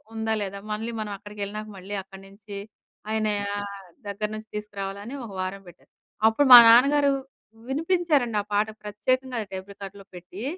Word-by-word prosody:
ఉందా, 220 0 -1
లేదా? 200 0 -6
మళ్ళీ 225 +2 -4
మనం 210 -1 -4
అక్కడికెళ్ళినాక 210 +1 -6
మళ్ళీ 195 +3 -8
అక్కడి 195 0 -13
నుంచి 200 0 -10 0.5
ఆయన 220 0 +1 0.3
ఆహ్, 200 -1 -6 0.3
దగ్గర 210 +1 -3
నుంచి 215 0 -11
తీసుకురావాలని 205 +2 -5
ఒక 215 - -9
వారం 190 +1 -4
పెట్టారు. 175 - -21 0.4
అప్పుడు 275 +6 +2
మా - - +15
నాన్నగారు 280 +4 +6 0.6
వినిపించారండి 300 - +1
ఆ - - -9
పాట 205 +1 +3 0.2
ప్రత్యేకంగా 255 +5 -1
టేప్ 190 +1 -7
రికార్డర్‌లో 200 0 -10
పెట్టి, 180 +4 -9
210 Hz, 150 wpm, -25 LUFS, 200-230 Hz, 0.6 s, మా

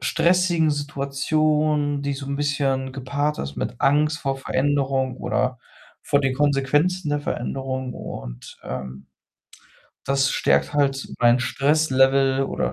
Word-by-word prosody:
stressigen 170 -1 +2
Situation, 145 +1 0
die 140 - -1
so 140 0 -6
'n 140 0 -3
bisschen 135 -2 -1
gepaart 145 +3 -2
ist 70 0 -5
mit 120 - -4
Angst 150 +3 +2
vor 135 -3 -2
Veränderung 135 -1 0
oder 130 -1 -1 0.4
vor 140 - +2
den 135 -1 0
Konsequenzen 145 +5 +1
der 145 0 0
Veränderung 130 -1 -4
und, - - -8
ähm, 65 0 -7 1.0
das 135 0 +2
stärkt - - +1
halt 140 -2 +1
mein 120 +1 +5
Stresslevel 135 -1 +2
oder - - -2
140 Hz, 125 wpm, -23 LUFS, 130-145 Hz, 1.0 s, mein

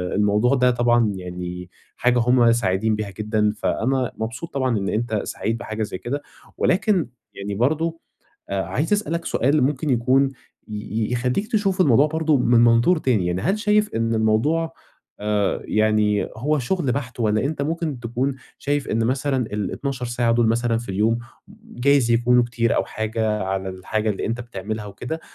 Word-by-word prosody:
الموضوع 105 +6 +3
ده 125 -1 +4
طبعًا 120 -2 +2
يعني 90 -1 -6 0.3
حاجة 125 0 +2
هُم 120 0 +4
سعيدين 110 -1 +1
بيها 105 -1 -4
جدًا، 105 -1 +1
فأنا 130 +3 0
مبسوط 115 +9 -5
طبعًا 130 -4 0
إن 100 -1 -2
أنت 110 -1 -1
سعيد 115 +2 -3
بحاجة 110 -1 -4
زي 105 - -4
كده، 140 +8 -4 0.4
ولكن 190 - +2 0.3
يعني 100 0 -5
برضه 160 +8 0 0.5
آآ، 100 -1 0
عايز 130 - -2
أسألك 170 -5 0
سؤال 140 +2 +2
ممكن 145 +2 0
يكون 130 +3 +3 0.4
ي 110 +2 -3
يخلّيك 125 - -1
تشوف 195 -4 +1
الموضوع 140 -2 +5
برضه 160 -1 +1
من 120 -1 +4
منظور 120 +9 +4
تاني، 115 -11 +1
يعني 90 +1 -1
هل 200 - +1
شايف 210 0 +2
إن 115 0 0
الموضوع 115 +10 +1 0.5
آآ 105 -1 0
يعني 105 -1 +2
هو 150 +6 0
شغل 140 0 0
بحت، 125 -3 -4
والَّا 110 0 +1
أنت 140 0 -2
ممكن 155 -3 -2
تكون 125 +4 -1 0.2
شايف 145 -1 -1
إن 115 +1 +1
مثلًا 130 0 0
ال12 125 +5 -3
ساعة 120 -1 +1
دُول 115 0 +3
مثلًا 115 0 +1
في 120 - -9
اليوم، 110 +4 +1 0.5
جايز 130 -1 +2
يكونوا 120 +1 +4
كتير 115 -1 0
أو - - +2
حاجة 110 -1 -2
على 95 0 -2
الحاجة 105 +4 -2
اللي 100 - -3
أنت 115 +2 -2
بتعملها 110 -2 -5
وكده، 120 +11 -6
120 Hz, 165 wpm, -22 LUFS, 110-140 Hz, 0.5 s, الموضوع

